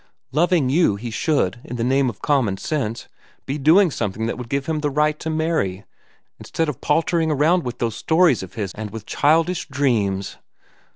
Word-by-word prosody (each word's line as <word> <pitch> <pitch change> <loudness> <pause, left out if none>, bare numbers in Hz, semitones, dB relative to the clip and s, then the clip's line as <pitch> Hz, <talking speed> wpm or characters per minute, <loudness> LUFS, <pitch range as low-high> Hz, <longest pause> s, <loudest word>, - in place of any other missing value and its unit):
Loving 165 0 +2
you, 155 - +3
he 115 +3 -6
should, 120 - 0
in 125 - -7
the 115 - -2
name 135 +1 +2
of 105 - -10
common 130 -10 +1
sense, 120 -3 -3 0.4
be 140 +3 -3
doing 165 +6 +5
something 110 -2 -3
that 115 - -2
would 125 -1 -8
give 140 -1 -1
him 160 0 -1
the 150 -1 -1
right 150 +2 +1
to 160 - -4
marry, 155 - -1 0.5
instead 165 - -2
of 150 -5 -5
paltering 165 +1 +1
around 155 +5 +3
with 125 -1 -5
those 115 -2 -2
stories 160 - +3
of 95 +1 -10
his 100 -5 -4
and 110 -1 -6
with 110 +1 -8
childish 165 +4 +1
dreams. 110 -9 -1
140 Hz, 185 wpm, -21 LUFS, 115-160 Hz, 0.5 s, doing